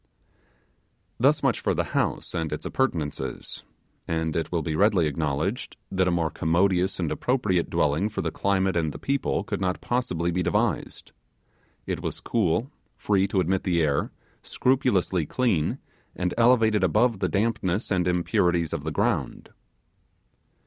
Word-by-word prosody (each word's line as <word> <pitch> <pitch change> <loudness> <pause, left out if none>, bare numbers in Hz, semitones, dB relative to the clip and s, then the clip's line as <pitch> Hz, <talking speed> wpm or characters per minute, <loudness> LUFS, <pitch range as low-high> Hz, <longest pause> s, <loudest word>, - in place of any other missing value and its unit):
Thus - - +3
much - - +2
for - - 0
the - - +1
house, - - -1
and 80 -2 -2
its 75 - -4
appurtenances; 75 - -2 0.4
and 80 -1 -1
it 80 - -2
will 85 -2 0
be 80 0 -2
readily 100 -1 +3
acknowledged 75 - -2
that 95 -1 +1
a - - +3
more 85 -2 0
commodious 90 +3 +1
and 85 -4 -1
appropriate 110 -9 0
dwelling 80 +8 +1
for 110 - -4
the - - -1
climate 95 -1 0
and 80 -4 0
the - - -7
people 140 0 -1
could - - -4
not 90 -1 0
possibly 90 -9 -1
be 90 +2 0
devised. 85 -1 -1 0.7
It - - -3
was - - -4
cool, 115 - 0 0.3
free 100 -2 +1
to 95 0 0
admit 95 +2 0
the 85 -3 +1
air, 70 -2 0 0.3
scrupulously 100 - +1
clean, 110 -12 0 0.4
and 90 -1 -1
elevated 115 -3 +4
above 115 -1 +2
the - - 0
dampness 105 -1 0
and 90 -2 +1
impurities 85 -1 +1
of 80 -4 -3
the 80 - -2
ground. - - -1
90 Hz, 150 wpm, -25 LUFS, 80-105 Hz, 0.7 s, elevated